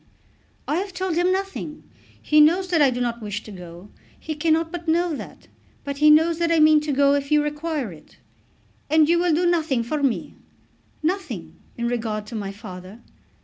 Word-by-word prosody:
"I 300 - 0
have 385 +1 -4
told 370 -3 -2
him 350 +2 +2
nothing. 380 -5 -4 0.4
He 305 0 +4
knows 355 +5 +4
that 335 -3 +2
I 280 - +6
do 245 -1 -3
not 240 -1 -2
wish 210 0 -5
to 215 - -11
go. 180 0 -11 0.3
He 315 - -5
cannot 320 +1 +1
but 345 -1 -7
know 335 0 +1
that. - - -10 0.4
But 280 -1 -5
he 305 +1 +5
knows 320 +2 +4
that 335 0 +1
I 330 - +3
mean 310 0 +6
to 300 0 -3
go 280 0 +3
if 285 0 -2
you 300 0 +4
require 295 - -3
it." 155 - -18 0.7
"And 310 0 +4
you 340 +1 +3
will 350 0 +2
do 350 +3 +1
nothing 315 -8 +1
for 290 +6 -3
me?" 270 -4 -1 0.7
"Nothing, 270 - -3 0.2
in 235 - -2
regard 220 -3 -2
to 225 - -9
my 200 -2 -4
father." 195 0 -10
300 Hz, 195 wpm, -23 LUFS, 235-330 Hz, 0.7 s, I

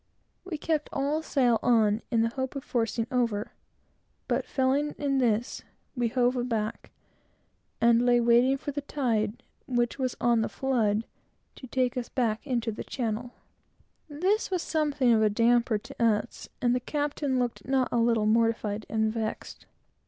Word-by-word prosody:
We 370 -4 -5
kept 305 0 -1
all 285 +3 -1
sail 250 -7 +2
on, 220 -2 +3
in 230 -2 +2
the 230 - +1
hope 260 +1 -3
of 275 - -5
forcing 230 -4 -1
over, 230 -5 -1 0.7
but - - -1
failing 275 +3 0
in 275 -2 0
this, 235 -1 0 0.3
we 240 -2 +1
hove 245 +1 +1
aback, 230 -3 -2 0.9
and 235 +1 +4
lay 245 -1 +4
waiting 240 +3 +4
for 290 - -5
the 290 +1 -4
tide, 235 -7 -1 0.2
which 240 0 0
was 255 -1 -2
on 235 -1 +3
the 220 - -1
flood, 225 -5 0 0.5
to 260 - -11
take 255 0 0
us 245 - -3
back 230 0 -1
into 235 -3 -1
the 215 - -6
channel. 240 0 -4 0.8
This 370 +9 0
was 365 -3 -1
somewhat 300 -3 -1
of 235 -3 +5
a 215 - +4
damper 230 +1 +3
to 210 - -6
us, 225 0 0
and 240 0 +3
the 250 - +1
captain 290 0 -2
looked 240 -4 -2
not 265 -1 +2
a - - +1
little 230 -2 +2
mortified 220 -1 +1
and 220 0 0
vexed. 220 -1 -5
240 Hz, 160 wpm, -28 LUFS, 225-265 Hz, 0.9 s, of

